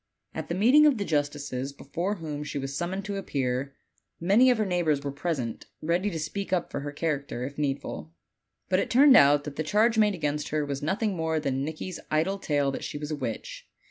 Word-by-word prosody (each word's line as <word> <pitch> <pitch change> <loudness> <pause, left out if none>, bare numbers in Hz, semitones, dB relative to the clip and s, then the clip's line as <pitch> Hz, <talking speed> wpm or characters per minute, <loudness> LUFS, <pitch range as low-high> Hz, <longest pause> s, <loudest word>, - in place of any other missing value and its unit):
At - - -5
the 170 - -1
meeting 260 +10 +6
of 280 -5 +3
the 200 - -2
justices, 145 -3 -2
hefore 175 +8 -3
whom 150 -3 -5
she 150 - -5
was 135 0 -4
summoned 185 +5 -3
to 200 -1 -3
appear, 135 -5 -2 0.4
many 205 +9 +5
of 250 - +4
her 215 - +1
neighbors 170 -6 +1
were 140 - -2
pres 155 +2 -2
ent, 115 -2 -5
ready 175 +6 0
to 170 - -4
speak 190 +6 -4
up 180 -2 0
for - - -3
her 145 +1 -5
character, 145 -5 -2
if 140 +3 -6
needful. 135 - -3 0.6
But 185 0 +2
it - - -1
turned 270 +2 +7
out 145 +1 +6
that 145 -1 -7
the - - 0
charge 220 +7 +3
made 210 -2 +4
against 150 -2 -2
her 150 -1 0
wag 140 -1 -4
nothing 195 +6 0
more 160 -1 0
than 135 -2 -1
Nicky's 160 +4 -5
idle 165 +6 +1
tale 145 -5 +1
that - - -5
she - - -4
was 150 +1 -5
a - - 0
witch. 125 -6 -6
155 Hz, 220 wpm, -27 LUFS, 140-190 Hz, 0.6 s, turned